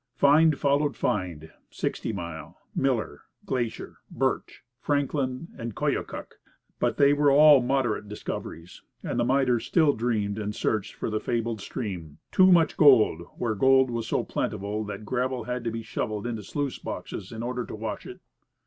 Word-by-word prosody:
Find 155 +1 +5
followed 145 +1 +1
find 85 -5 -2 0.2
Sixty - - -3
Mile, 85 -4 -7 0.2
Miller, 120 - -1 0.2
Glacier, 120 -4 -3
Birch, - - -2 0.2
Franklin, 140 0 -1
and 115 - -4
the 105 - -11
Koyokuk. - - -3 0.4
But - - 0
they 140 0 +5
were 145 0 +3
all 145 0 +7
moderate 120 -5 0
discoveries, 90 -4 -7 0.2
and - - -2
the - - +3
miners 125 -2 +2
still 155 -5 +4
dreamed 110 -3 -1
and 105 0 -3
searched 105 0 -1
for - - -4
the 110 - 0
fabled 115 -2 -2
stream, 90 - -6
"Too 185 0 +6
Much 165 -3 +4
Gold," 120 - +6 0.2
where 115 -2 -1
gold 130 +4 +4
was 115 -1 -3
so - - 0
plentiful 105 +2 -3
that 105 0 -7
gravel 130 +1 -1
had 125 +1 -4
to - - +1
be 115 0 -5
shovelled 110 -1 -3
into 120 -2 -2
the - - -14
sluice 145 -3 -3
boxes - - -6
in 115 0 -6
order 125 0 -2
to - - -7
wash 110 -1 -5
it. - - -10
120 Hz, 165 wpm, -26 LUFS, 105-135 Hz, 0.4 s, all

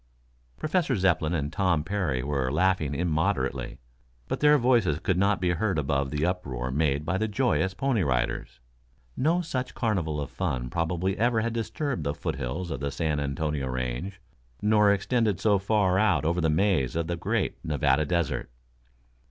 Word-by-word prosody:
Professor 155 -4 0
Zepplin 85 -4 +1
and 75 -1 -2
Tom 90 -6 +1
Parry 80 -9 -1
were 70 -2 -1
laughing 80 -2 +1
immoderately, 75 -6 -1 0.5
but - - -2
their 150 0 +6
voices 120 - +3
could 90 +3 0
not 100 +2 +2
be 90 -1 +1
heard 95 +1 0
above 70 -1 0
the 75 +3 -1
uproar 65 -9 -2
made 75 +1 0
by 95 +4 0
the 110 - 0
joyous 105 -4 0
Pony 130 -2 +1
Riders. 60 -3 -1 0.6
No 165 +6 +2
such 135 -7 -4
carnival 90 -10 -1
of 70 - -5
fun 60 -1 -3
probably 90 +3 -1
ever 115 -1 +2
had 115 0 -2
disturbed 115 - -2
the 70 0 -2
foothills 70 +7 -4
of 70 - -3
the 70 0 -2
San 75 +1 -1
Antonio 70 0 -2
range, 65 +10 -4 0.4
nor 105 -1 +4
extended 105 -1 +1
so 100 -1 +3
far 95 -2 +2
out 105 -7 +2
over 85 +2 +1
the 80 - +2
maze 80 -5 +1
of 85 0 0
the 85 +1 -2
great 85 - -2
Nevada 75 -1 +2
Desert. 85 0 -1
85 Hz, 165 wpm, -27 LUFS, 70-105 Hz, 0.6 s, their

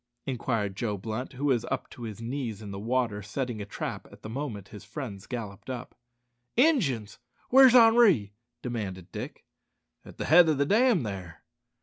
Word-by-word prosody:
inquired 115 -6 -2
Joe 105 -1 -2
Blunt, 110 +7 -5
who 135 +3 -4
was 125 -5 +2
up 135 - -3
to - - -12
his 110 -3 -6
knees 115 -3 -4
in 100 - -7
the 100 - -6
water 115 -1 0
setting 115 +2 -4
a 100 - -6
trap - - -5
at - - -16
the 110 - -6
moment 115 -7 -5
his 105 - -10
friend 110 -10 -7
galloped 110 -3 -6
up. 125 -1 -6 0.6
"Injuns! 205 - +2 0.3
Where's 260 -1 +8
Henri?" 225 - +6 0.3
demanded 100 -8 -5
Dick. - - -7 0.6
"At - - -13
the - - -3
head 165 +1 +7
o' 155 - +3
the 140 +1 +1
dam 220 - +4
there." 90 -7 -7
120 Hz, 175 wpm, -28 LUFS, 105-145 Hz, 0.6 s, Where's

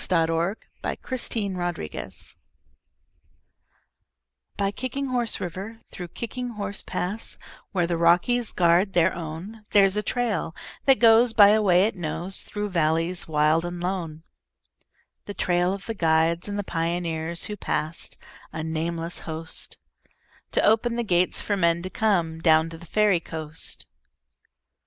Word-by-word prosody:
SONG 165 -3 +2
OF 170 +5 0 0.3
THE - - -2
KICKING 225 -6 -2
HORSE 175 - -5 2.2
By 200 0 +1
Kicking 260 +5 -4
Horse 245 -3 0
River, 190 +6 -6
through 180 - -7
Kicking 245 +7 -5
Horse 200 -2 -4
Pass, 200 +5 -3 0.3
Where 180 -3 +1
the 170 0 -1
Rockies 180 +8 +3
guard 175 +3 +3
their 175 +1 +3
own, 175 +7 -7
There's 195 -1 +5
a 210 - +1
trail 210 -9 -1 0.3
that 270 -2 +6
goes 230 0 +6
by 205 -2 +8
a 215 +1 +4
way 185 -3 +5
it 215 +2 0
knows 175 +2 -2
Through 210 0 -4
valleys 165 +1 0
wild 155 +1 +3
and 175 0 -5
lone,— 175 -3 -3 1.0
The 205 - -7
trail 175 0 +1
of 195 0 -5
the 225 - -3
guides 165 0 +2
and 205 - -3
the 205 - -1
pioneers 165 -1 -2
Who 210 - -3
passed—a 155 -2 -4
nameless 165 +1 -3
host— 160 +1 -4 0.8
To - - +2
open 225 +2 +3
the 240 - 0
gates 180 -4 +2
for 205 - 0
men 170 -2 +2
to 185 - -5
come 175 -7 +1
Down 160 0 +4
to 165 - -7
the 170 - -13
Fairy 210 -1 +3
Coast. 160 -1 -5
180 Hz, 140 wpm, -25 LUFS, 165-210 Hz, 2.2 s, by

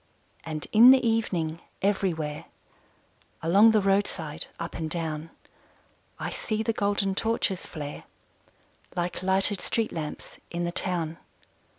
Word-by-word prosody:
And 155 -1 -5
in 230 +3 +9
the 260 -2 +6
evening, 175 -8 0 0.2
everywhere 170 -7 0 1.0
Along 195 +7 +6
the 215 -2 +3
roadside, 190 -6 0
up 170 0 -5
and 160 -1 -4
down, 160 -1 -3 0.9
I - - -4
see 220 0 -2
the 230 - 0
golden 200 -2 0
torches 200 -3 -1
flare 145 -2 -7 0.9
Like 175 0 -2
lighted 190 +1 +3
street 225 -1 -1
lamps 155 -3 -6
in 175 0 -3
the 175 - -1
town. 170 -3 -1
180 Hz, 120 wpm, -27 LUFS, 160-205 Hz, 1.0 s, in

